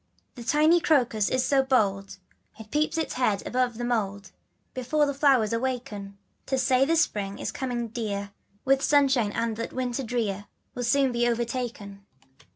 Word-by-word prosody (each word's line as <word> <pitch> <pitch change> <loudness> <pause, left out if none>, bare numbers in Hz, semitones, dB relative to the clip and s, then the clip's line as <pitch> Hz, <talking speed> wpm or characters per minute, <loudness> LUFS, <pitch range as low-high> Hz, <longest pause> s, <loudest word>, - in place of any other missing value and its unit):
HE 240 -2 -9
tiny 310 +6 +4
crocus 240 -10 +2
is 255 0 +1
so 275 -1 +3
bold 200 -8 0 0.4
It 220 -1 -12
peeps 305 +2 0
its 320 - -2
head 215 -6 0
above 250 -2 0
the 240 - -3
mould, 200 -5 -2 0.4
Before 275 +4 +1
the 285 - -1
flowers 270 -6 +3
awaken, 230 -5 -4 0.3
To 265 - 0
say 255 +1 +3
that 330 +3 +2
spring 200 -10 0
is - - -4
coming, 245 -3 -3
dear, 205 -3 -4 0.3
With 270 0 +3
sunshine 270 -7 +3
and 230 0 -2
that 230 - -5
winter 255 0 -2
drear 220 -5 -2 0.3
Will 245 - -4
soon 270 +2 +3
be 240 0 +1
overtaken. 235 -4 -4
245 Hz, 165 wpm, -26 LUFS, 215-265 Hz, 0.4 s, tiny